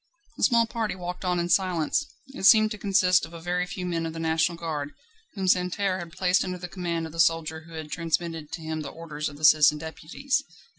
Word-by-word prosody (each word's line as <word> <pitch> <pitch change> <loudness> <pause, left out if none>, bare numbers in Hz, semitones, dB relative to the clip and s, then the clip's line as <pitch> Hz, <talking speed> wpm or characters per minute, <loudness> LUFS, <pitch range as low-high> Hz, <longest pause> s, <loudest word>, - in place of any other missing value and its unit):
The - - -10
small 235 -3 +5
party 225 -2 -3
walked 180 0 -6
on 180 -1 0
in 170 - -1
silence. 180 - +1 0.2
It 270 -8 +1
seemed 215 -1 +7
to 210 - -5
consist 185 -2 +3
of 165 - -7
a - - -7
very 180 +2 -1
few 180 0 -5
men 165 -2 -2
of 160 - -6
the 165 - -6
National 160 +1 +1
Guard, 150 -4 -4 0.4
whom 190 -2 -2
Santerne 185 +1 +1
had 170 -2 -7
placed 185 +1 +2
under 185 -1 -4
the 180 0 -7
command 170 -2 -3
of 160 - -8
the 165 - -9
soldier 160 -1 +1
who 165 - -13
had 155 -1 -7
transmitted 165 -2 -2
to 170 - -5
him 160 0 -3
the 145 - -6
orders 150 -2 -5
of 145 - -12
the 155 - 0
Citizen 150 -1 +6
Deputies. 165 - -3
170 Hz, 230 wpm, -26 LUFS, 160-185 Hz, 0.4 s, seemed